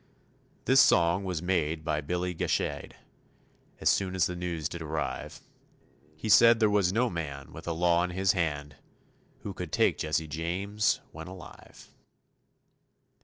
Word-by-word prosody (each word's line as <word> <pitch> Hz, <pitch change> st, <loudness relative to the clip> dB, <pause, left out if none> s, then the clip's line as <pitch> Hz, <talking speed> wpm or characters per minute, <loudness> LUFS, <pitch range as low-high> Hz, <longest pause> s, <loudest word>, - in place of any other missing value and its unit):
This 135 Hz, +1 st, +6 dB
song 85 Hz, -1 st, +3 dB
was 90 Hz, -3 st, -3 dB
made 80 Hz, -3 st, -1 dB
by 75 Hz, 0 st, 0 dB
Billy 90 Hz, +4 st, -2 dB
Gashade, 80 Hz, -, -2 dB, 0.8 s
As -, -, -2 dB
soon 95 Hz, -1 st, +2 dB
as 90 Hz, -2 st, +3 dB
the 90 Hz, -, -3 dB
news 85 Hz, -3 st, -3 dB
did 85 Hz, +1 st, -8 dB
arrive; 80 Hz, 0 st, -4 dB, 0.7 s
He 80 Hz, -, -6 dB
said 115 Hz, +2 st, +7 dB
there 110 Hz, -2 st, +3 dB
was 100 Hz, -3 st, +2 dB
no 120 Hz, +5 st, +2 dB
man 70 Hz, -, -6 dB
with -, -, -10 dB
the 85 Hz, -, -2 dB
law 85 Hz, 0 st, +2 dB
in 90 Hz, -, -1 dB
his 95 Hz, +1 st, +1 dB
hand 75 Hz, -5 st, -2 dB, 0.6 s
Who 100 Hz, -, -6 dB
could 90 Hz, -4 st, -7 dB
take -, -, +2 dB
Jesse 80 Hz, +1 st, -1 dB
James 95 Hz, +7 st, -1 dB
when 80 Hz, +1 st, -9 dB
alive. 95 Hz, -2 st, -13 dB
90 Hz, 150 wpm, -28 LUFS, 80-95 Hz, 0.8 s, said